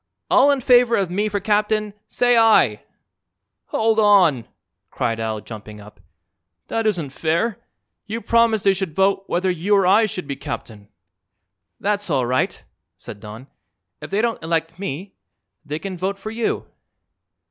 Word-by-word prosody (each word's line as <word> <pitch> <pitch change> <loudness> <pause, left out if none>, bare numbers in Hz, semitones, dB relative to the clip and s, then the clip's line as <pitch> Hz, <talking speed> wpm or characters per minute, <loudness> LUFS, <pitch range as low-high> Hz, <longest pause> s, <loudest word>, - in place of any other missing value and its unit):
All 275 +2 +6
in 280 -2 +2
favor 245 -1 +5
of 195 -5 -1
me 205 +4 0
for 205 0 -2
captain 210 +1 0
say 245 0 +2
'aye.'" 220 - +4 0.8
"Hold 220 0 +1
on!" 185 - +4 0.4
cried 115 +1 -2
Al, 110 -1 -3
jumping 105 -1 -10
up. 105 +1 -15 0.7
"That 225 -1 0
isn't 170 -10 -1
fair. 170 - -1 0.5
You 220 +3 -3
promised 230 -2 +2
they 195 - +4
should 185 -4 -4
vote 195 0 +2
whether 185 +2 0
you 180 +4 +1
or 195 -2 +3
I 210 +4 +5
should 195 -5 -5
be 140 -1 -4
captain." 110 -6 -7 0.9
"That's 205 -1 -1
all 135 -5 +1
right," 130 +2 -1 0.3
said 105 - -10
Don. 110 +4 -10 0.6
"If - - -8
they 205 +3 0
don't 230 -5 -1
elect 165 +1 -2
me 190 +1 -5 0.5
they 150 0 -4
can 185 +1 -6
vote 195 +2 -2
for 215 +2 -7
you." 225 0 -2
195 Hz, 155 wpm, -21 LUFS, 150-215 Hz, 0.9 s, All